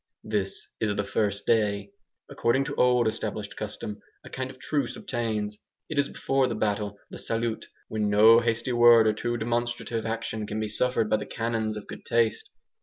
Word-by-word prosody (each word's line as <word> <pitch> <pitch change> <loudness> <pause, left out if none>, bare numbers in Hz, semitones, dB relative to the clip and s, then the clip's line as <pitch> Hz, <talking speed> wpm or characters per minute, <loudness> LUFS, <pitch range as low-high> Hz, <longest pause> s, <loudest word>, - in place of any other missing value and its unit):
This 105 -3 -3
is 105 -2 0
the 100 - 0
first 100 0 -1
day. 100 -3 +1 0.4
According 125 +4 +1
to - - -4
old 125 -2 +4
established 110 -2 -3
custom, 105 -1 -5 0.2
a - - -12
kind 130 0 -3
of 130 - -11
truce 140 -1 -1
obtains. 110 -4 -3 0.3
It 155 -3 0
is 140 - +2
before 135 -1 +1
the 115 - -2
battle, 105 -1 -1
the - - -7
"salut," 115 0 -2 0.2
when 105 -1 -1
no 110 +3 +7
hasty 115 +1 -1
word 120 -1 +7
or 110 - +4
too 120 +2 -2
demonstrative 120 0 -2
action 110 -1 -3
can 105 +1 -3
be 110 -1 -2
suffered 125 +1 +1
by 110 - +2
the 105 - -6
canons 115 -2 -2
of 105 - -8
good - - -9
taste. 115 -2 +1
110 Hz, 180 wpm, -27 LUFS, 105-120 Hz, 0.4 s, no